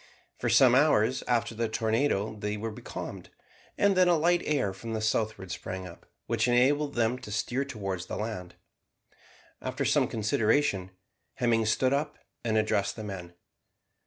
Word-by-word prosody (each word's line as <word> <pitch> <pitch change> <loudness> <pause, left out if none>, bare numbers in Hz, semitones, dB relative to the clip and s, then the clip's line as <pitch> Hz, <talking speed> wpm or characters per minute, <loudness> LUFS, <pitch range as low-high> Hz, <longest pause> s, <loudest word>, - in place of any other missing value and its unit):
For - - 0
some 125 -2 +6
hours 130 -3 +3
after 120 -1 +1
the 115 0 -2
tornado 110 -1 0
they 105 0 -3
were 110 +2 -4
becalmed, 105 - -7 0.5
and 200 -1 +3
then 185 -1 +5
a 175 -1 +4
light 175 +3 +3
air 135 -10 0
from 115 +4 -7
the 110 - -1
southward 110 -3 -1
sprang 95 +1 -5
up, 85 -2 -12 0.2
which 115 +1 +1
enabled 140 +4 +3
them 120 +1 +1
to 105 - -9
steer 120 +5 -1
towards 95 -9 -5
the - - -4
land. 105 -5 -5 1.1
After - - -3
some - - +3
consideration, 110 -1 +1 0.5
Hemming 115 -2 +2
stood 130 +4 +2
up 145 +2 -1 0.3
and 110 -2 +1
addressed 100 -2 +1
the 110 - -7
men. 90 -4 -7
115 Hz, 160 wpm, -28 LUFS, 105-130 Hz, 1.1 s, some